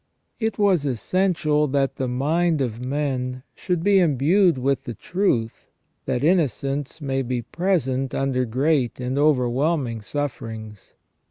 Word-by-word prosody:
It 220 -2 -1
was 195 -7 +3
essential 150 - +1
that 135 0 0
the 130 - -1
mind 155 +6 +1
of 120 -3 -2
men 130 -2 -2
should 180 -4 -2
be 200 0 +5
imbued 170 +2 +3
with 135 0 0
the 120 - -5
truth, 125 - -1 0.4
that 125 - -1
innocence 145 - 0
may 135 -2 -1
be 125 -1 -2
present 135 - -1
under 130 -2 0
great 130 +2 0
and 125 +1 -2
overwhelming 135 -2 +1
sufferings. 110 -5 -6
140 Hz, 125 wpm, -23 LUFS, 125-160 Hz, 0.4 s, be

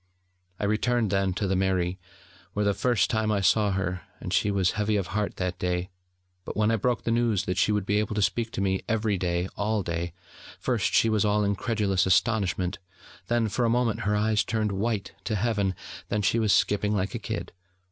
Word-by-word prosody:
I - - -4
returned 110 +1 +1
then 95 -1 +1
to 100 - -1
the 95 - +1
mairie, 95 -1 0 0.5
where 105 0 0
for - - +2
the 100 - +3
first 120 +1 +1
time 110 -1 +1
I 100 -2 +1
saw 105 +3 +3
her, 95 -1 -2 0.2
and - - -5
she 105 - +2
was 95 -3 +2
heavy 105 0 0
of 100 -3 0
heart 105 -1 -1
that 90 -1 -3
day: 90 0 -1 0.5
but - - -6
when 105 +1 +3
I - - +3
broke 120 +2 0
the 115 - -1
news 115 -4 +1
that 90 0 -1
she 105 - +3
would 105 -2 0
be 105 +1 +2
able 105 0 -2
to 105 - +1
speak 110 +6 0
to - - -2
me, 95 -1 0
every 110 -3 +1
day, 85 0 0
all 105 0 0
day, 85 0 -3 0.5
first - - 0
she - - +5
was 110 -2 +2
all 105 0 +2
incredulous 100 -2 +1
astonishment, 95 -2 +1 0.5
then, 120 0 +1
for 110 +4 -1
a 115 - +3
moment, 120 -2 +1
her 105 +1 0
eyes 105 -1 +2
turned 110 -1 -1
white 100 0 -2
to 105 - -1
Heaven, 100 -3 0 0.3
then 105 0 0
she 115 +4 +2
was 110 -2 +2
skipping 105 +1 +2
like 95 -1 -1
a - - -3
kid. - - -5
105 Hz, 215 wpm, -27 LUFS, 95-110 Hz, 0.5 s, she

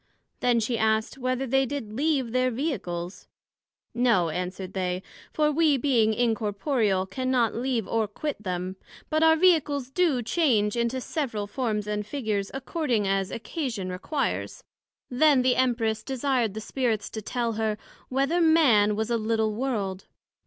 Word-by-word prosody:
Then 245 -1 +3
she 230 +1 -1
asked, 220 +3 +1
Whether 255 +1 -1
they 270 +1 +2
did 255 -7 -5
leave 270 -2 0
their 255 +1 +2
Vehicles? 200 - -4 0.7
No, 235 -9 +2
answered 180 +3 -4
they; 185 -1 -2 0.3
for 300 -1 +2
we 300 -2 +3
being 240 -5 +3
incorporeal, 220 -3 0
cannot 250 +2 0
leave 240 -2 -1
or 225 -2 0
quit 280 +4 -5
them: 185 -1 -4 0.3
but 310 0 +2
our 320 0 +6
Vehicles 300 -6 +2
do 290 -6 +2
change 225 -5 +2
into 235 +2 0
several 245 -7 -3
forms 215 -1 -2
and 210 0 -2
figures, 210 -4 -2
according 265 - -1
as 195 0 0
occasion 230 - -4
requires. 275 +11 -3 0.5
Then 270 0 +4
the 255 -1 +3
Empress 230 -4 +1
desired 260 -5 -1
the 220 - -4
Spirits 225 -3 -1
to 220 - -5
tell 235 +2 -2
her, 215 -1 -1 0.3
Whether 275 +7 +1
Man 260 -11 +5
was 220 +2 -2
a 235 - +2
little 220 -1 0
World? 210 -6 -3
235 Hz, 145 wpm, -26 LUFS, 210-270 Hz, 0.7 s, our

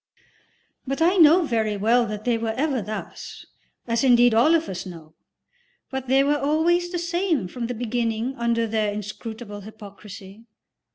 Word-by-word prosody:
But 275 +1 -2
I 350 +4 +3
know 335 +2 +6
very 220 -5 -1
well 230 +4 +2
that 210 0 -6
they 240 -1 +2
were 225 -1 -2
ever 275 -3 0
thus 215 +1 -8 0.4
(as 230 +1 0
indeed 245 -2 +5
all 250 +9 +5
of 330 0 0
us 185 -1 -5
know); 165 -4 -11 0.8
they 265 0 +1
were 290 +1 +1
always 335 +5 +1
the 355 - -2
same 340 - -1
from 235 +4 -5
the 245 - -4
beginning 235 +1 -2
under 235 -2 0
their 215 -1 -1
inscrutable 210 +1 -7
hypocrisy. 205 0 -12
235 Hz, 155 wpm, -23 LUFS, 215-280 Hz, 0.8 s, know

